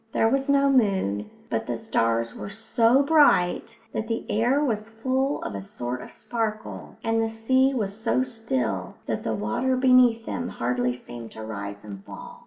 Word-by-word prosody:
There 225 - +3
was 270 +3 0
no 280 0 +4
moon, 190 - +2 0.2
but 115 -1 -1
the 120 - -2
stars 115 0 0
were - - -7
so 230 +5 +3
bright 280 - +3 0.2
that 220 - -2
the 225 0 -2
air 240 +6 +2
was 215 -4 -2
full 260 +5 -1
of - - -4
a 100 - -4
sort 120 +5 -5
of - - -9
sparkle; 220 -2 -4
and 225 0 +1
the 225 - 0
sea 260 +5 +2
was 200 -4 -1
so 225 +3 +1
still 130 - -2
that - - -2
the 110 - -2
water 110 - 0
beneath 250 -3 +5
them 245 - -3
hardly 125 +1 -1
seemed 120 -2 -9
to 110 - -8
rise 100 -2 -6
and 100 -2 -9
fall. - - -10
220 Hz, 180 wpm, -25 LUFS, -, 0.2 s, beneath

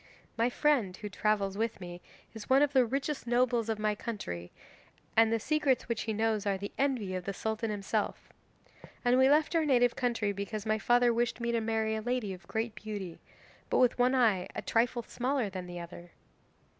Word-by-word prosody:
My 230 +2 +2
friend, 245 -10 +1
who 210 - -6
travels 200 -1 0
with 225 -1 -1
me, 175 -1 -8 0.3
is 220 -2 -9
one 270 +2 +6
of 290 -1 +1
the 255 -3 +4
richest 275 +1 -3
nobles 240 -1 +2
of 220 - 0
my 215 0 +1
country, 195 - -6 0.6
and 225 0 +5
the 230 - +2
secrets 290 0 +1
which 235 -2 -1
he 220 - -2
knows 220 -1 0
are 195 -1 +1
the 200 +1 -6
envy 255 -9 0
of 185 -1 -4
the 200 - -3
Sultan 220 +1 -2
himself. 210 +1 -3 0.7
And 245 +1 +5
we 260 +1 +6
left 305 +3 +3
our 325 - +3
native 245 -5 +3
country 235 -5 0
because 200 +2 -5
my 215 0 +1
father 240 +1 +4
wished 235 +1 0
me 235 0 -1
to 230 -1 +1
marry 220 0 0
a 220 - -3
lady 240 -4 -2
of 180 -1 -12
great 220 +2 -2
beauty, 205 -6 -6 0.5
but - - +2
with 250 -1 +3
one 250 +2 +4
eye 215 -8 +3
a - - -4
trifle 235 +1 +1
smaller 250 -2 -1
than 185 -1 -6
the 175 0 -7
other." 170 0 -10
225 Hz, 200 wpm, -31 LUFS, 205-245 Hz, 0.7 s, one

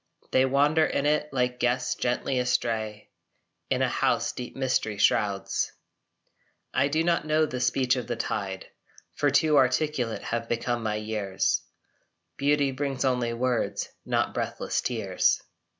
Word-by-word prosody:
They 130 - +4
wander 145 +4 +3
in 145 - 0
it 150 0 +1
like 125 -1 0
guests 125 +1 +1
gently 125 +1 -1
astray 110 -4 -1 0.6
In - - +1
a - - +3
house - - +1
deep 125 - -7
mystery 130 -5 0
shrouds. 100 -1 +1 1.0
I 135 +2 +3
do 155 +3 +1
not 170 -2 +1
know 155 +1 +3
the 130 -4 -4
speech 125 +1 +2
of 125 -3 -4
the 120 - -2
tide, 100 -4 -3 0.5
For 145 - +1
too 150 +2 +4
articulate 130 -3 +1
have 115 0 -3
become 120 0 -1
my 110 -1 -1
years: 105 -3 -1 0.7
Beauty 140 +3 +2
brings 135 0 -2
only 125 -2 +1
words, 125 0 -1
not - - 0
breathless - - -2
tears. - - +1
125 Hz, 140 wpm, -27 LUFS, 115-140 Hz, 1.0 s, They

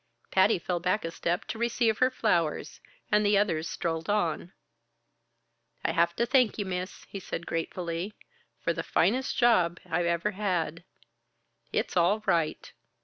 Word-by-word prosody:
Patty 190 +3 +4
fell 175 0 -2
back 185 +3 0
a 165 - -3
step 175 +2 -2
to 225 - -6
receive 235 -2 +1
her 255 - +5
flowers 175 -11 0 0.3
and 210 0 +4
the 205 0 +4
others 170 -6 +1
strolled 165 0 -3
on. 175 -4 0 1.3
"I - - +2
have 170 +1 +2
to 235 - +1
thank 250 -2 +3
ye, 205 - -2
Miss," 185 0 -5
he 200 - -6
said 170 -2 -5
gratefully, 170 +3 -3 0.5
"for 170 - +1
the 165 - -3
finest 235 +11 +1
job 180 -9 +3
I 170 +2 0
ever 170 +4 0
had. 180 -5 -2 0.9
It's - - -1
all 190 +5 +3
right!" 165 -5 0
180 Hz, 150 wpm, -28 LUFS, 170-210 Hz, 1.3 s, her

